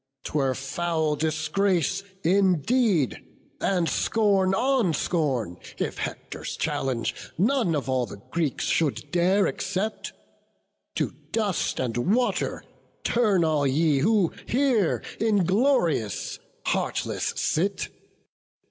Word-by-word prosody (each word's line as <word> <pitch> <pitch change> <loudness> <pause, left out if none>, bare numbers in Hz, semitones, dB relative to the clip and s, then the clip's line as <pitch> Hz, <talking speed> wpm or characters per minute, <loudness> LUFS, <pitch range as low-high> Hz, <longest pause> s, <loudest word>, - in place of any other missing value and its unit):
'Twere 135 -3 0
foul 160 +3 -1
disgrace 160 +4 0 0.2
indeed, 190 - +2 0.4
and 180 -4 +1
scorn 200 -3 +2
on 245 - +2
scorn, 130 - -1 0.2
If - - -3
Hector's - - -5
challenge 125 -4 -1 0.2
none 215 - +2
of 135 -4 -2
all 130 -2 +1
the 100 - -10
Greeks 160 -5 -1
Should 155 -5 0
dare 185 +3 +3
accept; 200 +3 -2 0.8
to - - 0 0.2
dust 210 -6 0
and 120 - +1
water 250 0 0 0.4
turn 210 -7 +3
All 155 -3 +2
ye 145 +1 +2
who 200 +2 +2
here 245 - +2 0.2
inglorious, 195 - +1 0.3
heartless - - -1
sit! 190 +5 0
175 Hz, 100 wpm, -26 LUFS, 150-205 Hz, 0.8 s, dare